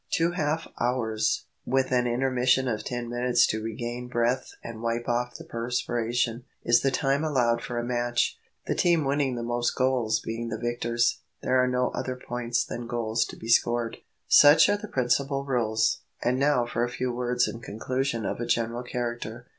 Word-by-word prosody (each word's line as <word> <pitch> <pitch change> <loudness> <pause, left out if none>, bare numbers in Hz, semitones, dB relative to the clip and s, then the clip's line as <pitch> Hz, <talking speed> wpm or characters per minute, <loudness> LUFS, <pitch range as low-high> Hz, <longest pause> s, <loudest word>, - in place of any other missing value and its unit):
Two 165 +1 +2
half 160 -2 -1
hours, 120 -3 0 0.2
with 130 0 0
an 125 -1 +2
intermission 130 +1 +2
of 110 -3 -2
ten 120 0 -4
minutes 120 0 +3
to 110 - -1
regain 120 +2 -5
breath 120 +1 0
and 115 -1 -7
wipe 115 0 -2
off 120 +1 -1
the - - -8
perspiration, 120 0 -1 0.2
is 120 0 +4
the 135 - +2
time 135 +2 +1
allowed 120 -6 +2
for 120 - -5
a 120 - -1
match, 120 0 0 0.3
the - - 0
team 170 -4 +2
winning 135 -2 +1
the 120 - -4
most 120 0 -1
goals 130 -4 +1
being 115 +1 -4
the 110 - -3
victors. 120 0 0 0.2
There 130 0 +3
are - - +2
no 125 0 +1
other 130 - -3
points 120 -1 -2
than 120 0 -6
goals 115 -1 0
to - - -9
be 110 - -9
scored. 120 0 +2 0.3
Such 150 +2 +7
are 205 - +3
the 215 - -8
principal 135 0 0
rules; 110 -4 +1 0.2
and 125 +2 +1
now 140 -3 +3
for 120 0 -1
a 120 - 0
few 125 0 -2
words 125 0 +1
in 115 - -6
conclusion 120 +1 -2
of - - -3
a 120 - -3
general 115 +1 0
character. 120 -1 -4
120 Hz, 185 wpm, -27 LUFS, 120-130 Hz, 0.3 s, Such